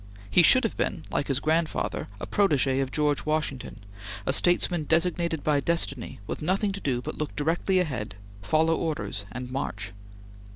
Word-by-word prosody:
He 180 - +8
should 255 +10 +6
have 225 - -1
been, - - -2
like - - -1
his 135 -2 +1
grandfather, 160 +2 0
a - - -4
protege 140 -9 +2
of 135 -1 -1
George 150 -1 +1
Washington, 145 -8 -3 0.4
a 135 - +1
statesman 175 0 +2
designated 170 -1 +1
by 150 -2 +2
destiny, 140 -7 -1
with - - -5
nothing 195 +5 +1
to 195 0 -6
do 125 -3 -1
but - - -6
look 150 - -3
directly 165 +5 +1
ahead, 125 - -2 0.3
follow 160 +10 +2
orders, 105 -12 -3
and 125 +2 -6
march. 105 -7 -4
155 Hz, 165 wpm, -27 LUFS, 130-170 Hz, 0.4 s, He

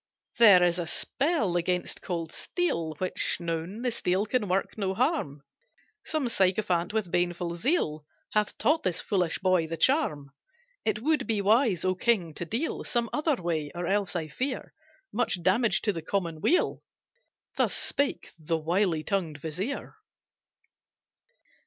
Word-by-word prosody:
"There 200 -6 +8
is 175 0 +2
a 170 - -3
spell 270 - 0
against 180 +1 -1
cold 165 -3 -4
steel 165 - -2
Which 185 +2 -1
known, 170 +6 -4
the 250 - +1
steel 195 -3 0
can 220 -1 0
work 190 +2 0
no 190 -3 -1
harm, 235 - 0 0.6
Some 310 -5 -1
sycophant 185 -4 +1
with 215 -5 -2
baneful 175 -1 0
zeal 170 - 0 0.3
Hath 210 -1 +1
taught 315 +3 +2
this 180 -2 -1
foolish 180 -5 0
boy 185 -3 +2
the 165 +1 -4
charm. 155 - +1 0.5
It 215 0 0
would 310 +1 +1
be 220 -3 +1
wise, 210 - +3
O 185 - +3
king, 185 -5 +1
to 175 - -5
deal 235 - -2
Some 235 -2 -1
other 300 0 +1
way, 165 -7 -2
or 175 0 -3
else 195 +1 0
I 160 -3 -2
fear 255 - -4 0.4
Much 205 -8 0
damage 215 +6 +3
to 210 - +1
the 165 - -5
common 165 -2 -2
weal." 360 - +2 0.7
Thus - - +1
spake 280 -11 0
the 165 +1 -1
wily 165 0 +1
tongued 175 -7 -1
vizier. 180 - -5
185 Hz, 150 wpm, -28 LUFS, 170-230 Hz, 0.7 s, There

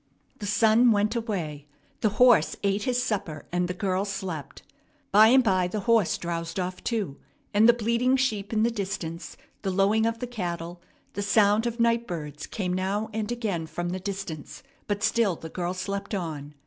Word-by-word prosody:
The 205 - -4
sun 225 +3 +5
went 210 +2 +1
away; 170 - -3 0.3
the 215 - +2
horse 245 -10 +5
ate 200 +1 0
his 250 -1 +1
supper; 175 - -3
and 175 0 0
the 180 - -3
girl 190 0 0
slept. 190 -7 -5 0.5
By 215 +2 +8
and 260 +3 +6
by 185 -5 +2
the 205 +3 -3
horse 225 -3 +3
drowsed 170 0 -4
off 180 0 -4
too, 205 - -2 0.4
and 215 +3 +6
the - - +8
bleating 235 +3 +1
sheep 215 -6 -1
in 220 -1 +2
the 235 - +2
distance, 190 -6 -5 0.2
the 195 - -2
lowing 200 +4 +3
of 230 0 -1
the 250 - -4
cattle, 175 -7 -5 0.3
the 205 - -3
sound 210 +2 +3
of 235 0 -4
night 235 0 +2
birds, 150 -4 -6
came 180 -4 -3
now 200 +4 -1
and 220 +1 -2
again 205 -9 -2
from 175 +2 -4
the 185 +1 -3
distance; 190 -5 -6 0.2
but 205 0 -2
still 220 -6 +2
the 160 - -9
girl 180 +2 -3
slept 200 +2 -3
on. 150 -5 -5
200 Hz, 185 wpm, -26 LUFS, 175-225 Hz, 0.5 s, By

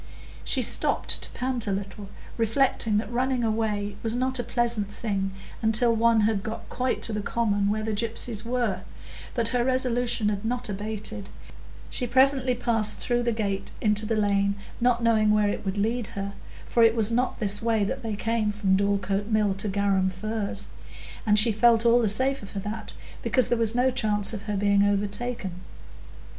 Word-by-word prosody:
She - - 0
stopped - - +2
to - - -2
pant 250 -3 -2
a - - 0
little, 195 0 -5 0.3
reflecting 225 -2 +1
that 220 - -3
running 250 0 0
away 210 -2 -1
was 225 0 -1
not 260 +1 0
a - - -1
pleasant 235 -3 0
thing 200 -3 -2 0.3
until 225 +1 +3
one 230 0 +3
had 210 -1 +1
got 220 +2 -6
quite 255 0 -1
to 225 - +2
the 210 - -2
common 205 -2 0
where 215 +1 -1
the 220 0 -2
gypsies 220 0 -2
were, 235 -6 -1 0.5
but 230 -2 0
her 245 0 +1
resolution 245 -3 +1
had 200 0 -3
not 245 +2 -2
abated; 210 0 -5 0.6
she 250 - -2
presently 260 0 +3
passed 225 -3 +1
through 240 -1 0
the 240 0 0
gate 200 -3 -3
into 210 0 +1
the 225 - 0
lane, 200 -1 +1 0.2
not 240 -1 +2
knowing 220 -2 +3
where 210 -1 +3
it - - -3
would 195 0 -3
lead 225 +2 -1
her, 200 0 -4 0.3
for 235 - +1
it 225 0 +5
was 225 -1 +2
not 250 +2 0
this 205 -1 +2
way 225 -2 +1
that 235 +7 -3
they 225 -3 -3
came 225 0 0
from 200 -2 +1
Dorlcote 200 0 0
Mill 215 -3 +2
to 195 +2 -3
Garum 195 -1 +1
Firs, 215 +2 -4 0.6
and 210 0 +4
she 220 +2 +5
felt 230 +2 +4
all 235 +1 +5
the 220 - +2
safer 260 +1 0
for 200 - -9
that, 215 +2 -6 0.3
because 255 -3 +2
there - - -11
was 225 0 +3
no 255 +1 +3
chance 215 -5 0
of 210 - -5
her 205 - -1
being 200 0 +3
overtaken. 205 -1 -2
220 Hz, 185 wpm, -26 LUFS, 205-235 Hz, 0.6 s, it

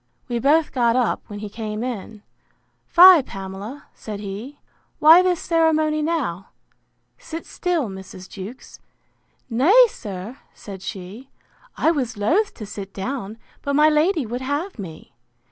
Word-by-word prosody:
We 240 -2 -2
both 300 +5 +3
got 235 -2 +2
up, 250 -2 +1
when 205 - -8
he 210 - -5
came 215 +1 -5
in: 220 -3 -6 0.6
Fie, 360 -2 +8
Pamela! 195 +5 -8
said 210 -2 -7
he; 210 +8 -7 0.4
why 320 +4 +8
this 365 -2 +1
ceremony 315 -2 +1
now?—Sit 320 - -6
still, 345 -8 -1
Mrs. 190 -1 -10
Jewkes.—Nay, 255 - 0
sir, 205 - -8 0.2
said 195 -3 -10
she, 200 +7 -8 0.5
I 320 - +3
was 255 -8 -2
loath 365 - +1
to 215 - -8
sit 200 -1 -8
down; 220 0 -5 0.2
but 280 0 -2
my 300 +1 +6
lady 310 0 +2
would 240 +3 -5
have 285 - -3
me. 165 -5 -9
250 Hz, 130 wpm, -22 LUFS, 205-310 Hz, 0.6 s, Fie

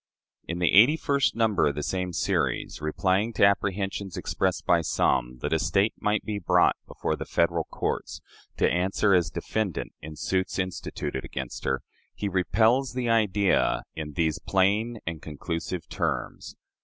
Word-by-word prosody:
In 85 - -3
the 90 -1 +2
eighty 125 +10 +7
first 140 -3 +1
number 110 -7 +2
of 70 - -1
the 75 - -3
same 90 +1 -2
series, 85 -8 -1
replying 95 +8 0
to 105 - +5
apprehensions 100 -1 0
expressed 95 -1 -1
by 85 -3 +4
some 60 -5 0
that 75 - 0
a 80 - +2
State 100 +6 +2
might 105 0 0
be 105 -1 -3
brought 85 - +3
before - - -2
the - - -5
Federal 85 -1 +1
courts - - -3 0.4
to - - +3
answer 95 +3 +2
as 85 -5 +3
defendant 105 -2 -3
in 75 +1 -8
suits 95 +4 -1
instituted 95 -2 -3
against 65 -2 -6
her, - - 0 0.3
he 105 - -3
repels 110 +8 +2
the 125 -2 -1
idea 105 -3 +2
in 75 -1 -6
these 80 +1 0
plain 105 +6 +1
and 80 -1 -4
conclusive 80 +2 -5
terms. - - -3
95 Hz, 155 wpm, -26 LUFS, 85-105 Hz, 0.4 s, eighty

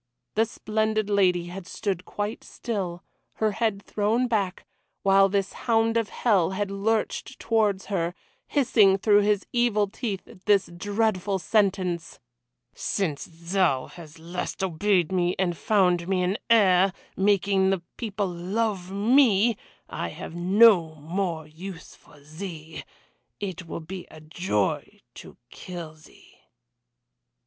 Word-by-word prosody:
The 225 +2 +2
splendid 215 -1 -1
lady 180 -4 +3
had 180 +1 -8
stood 185 -2 -3
quite 210 +2 -4
still, 190 -7 -4 0.3
her 220 -1 0
head 205 -2 -1
thrown 220 +4 0
back, 200 -5 -1 0.4
while 195 0 +5
this 195 0 -1
hound 225 -1 +1
of 230 -2 +1
hell 200 -8 +2
had 205 -1 -1
lurched 220 +5 -1
towards 210 -4 +1
her 175 -3 -2 0.3
hissing 225 -9 +4
through 205 +1 +4
his 205 -1 +1
evil 240 -4 +2
teeth 200 -2 -4 0.2
this 200 -4 +3
dreadful 205 0 0
sentence: 185 -4 0 0.5
"Since 165 -8 -2 0.3
thou 170 -10 +2
hast 165 -2 -12
at 160 - -16
last 180 +2 -4
obeyed 185 0 +1
me 180 -1 +1
and 180 -2 0
found 180 -3 +2
me 185 -1 +1
an 185 +3 0
heir, 195 -4 +5 0.2
making 195 -1 +2
the 190 -2 0
people 205 -4 -2
love 185 +2 -2
me, 225 +1 +4 0.3
I - - -4
have - - -8
no 180 -2 +5
more 165 +1 -3
use 165 +3 -9
for 145 - -19
thee. 160 +1 -8 0.6
It 185 -4 -5
will 165 - -5
be 180 +3 -8
a 155 - -12
joy 155 - -2
to - - -12
kill 170 -4 -8
thee!" 155 -1 -20
195 Hz, 130 wpm, -26 LUFS, 175-210 Hz, 0.6 s, while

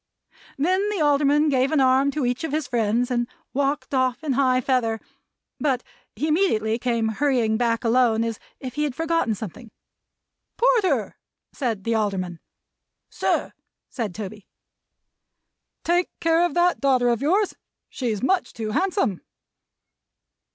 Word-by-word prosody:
Then 370 +8 +1
the 415 -3 -2
Alderman 295 0 +3
gave 265 -1 +2
an 310 - +3
arm 265 +1 +4
to 280 -1 -1
each 245 +4 -1
of 320 - -3
his 310 0 0
friends, 235 +2 0
and 240 -1 0 0.3
walked 280 +1 -1
off 260 +1 +1
in 290 -4 0
high 255 -1 +3
feather; 245 -3 0 0.6
but, 265 -4 0 0.3
he 285 +9 -2
immediately 235 - +1
came 230 -2 0
hurrying 240 -2 +1
back 230 0 0
alone, 230 -1 +3
as 230 -2 -3 0.2
if 255 -2 -6
he 300 - -1
had 285 -4 -2
forgotten 325 -9 0
something. 220 +4 -8 0.9
"Porter!" 375 - +2 0.4
said 230 -8 -2
the 230 - 0
Alderman. 190 -6 -1 0.7
"Sir!" - - -1 0.4
said 220 -8 -4
Toby. 210 -1 -7 1.4
"Take 350 +1 +1
care 330 +1 +3
of 315 - -9
that 350 0 +2
daughter 255 -3 +3
of 235 -1 0
yours. 380 +8 +2 0.3
She's 230 -5 -3
much 370 +6 +1
too 220 -2 -4
handsome." 355 - 0
255 Hz, 140 wpm, -24 LUFS, 230-300 Hz, 1.4 s, arm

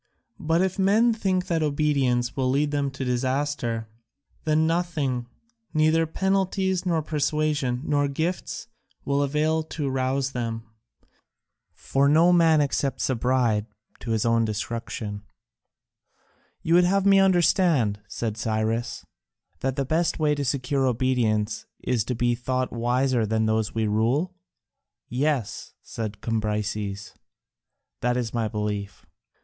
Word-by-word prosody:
But 165 +3 +2
if 190 +1 -2
men 215 +5 +4
think 185 -4 0
that 170 -4 0
obedience 140 -5 +1
will 130 -2 0
lead 145 +3 +1
them 145 -1 0
to 135 0 -5
disaster, 125 -2 -1 0.6
then 155 0 +3
nothing, 160 -8 -1 0.5
neither 155 +1 +3
penalties, 190 +1 0
nor 165 -3 +1
persuasion, 150 -4 0
nor 145 -2 +1
gifts, 160 +10 -3 0.4
will 140 0 +1
avail 150 +3 +1
to 155 -2 -4
rouse 135 +1 0
them. 115 -3 -3 1.1
For 140 +1 +1
no 165 +4 +5
man 165 -3 +5
accepts 135 -2 0
a - - +1
bribe 120 -3 +1 0.3
to 120 - -8
his 110 -1 +1
own 115 0 +3
destruction." 110 -1 -4 1.4
"You 165 - +1
would 175 +1 +6
have 195 +2 +2
me 195 -1 +6
understand," 175 - +3
said 110 -2 -4
Cyrus, 110 +2 -2 0.5
"that 135 -1 -1
the 140 -1 -1
best 165 +4 +1
way 155 -3 +2
to 145 -1 -2
secure 135 0 0
obedience 115 -4 0
is 120 -4 0
to 125 - -2
be 120 +1 +1
thought 130 +1 -2
wiser 120 +1 +1
than 110 +1 +1
those 110 0 0
we 110 -1 +1
rule?" 120 - +1 0.8
"Yes," 130 -3 -2
said 110 -2 -6
Cambyses, 105 -2 -2 0.9
"that 125 0 0
is 120 -3 -2
my 115 -2 0
belief." 105 -2 -4
135 Hz, 130 wpm, -25 LUFS, 115-155 Hz, 1.4 s, would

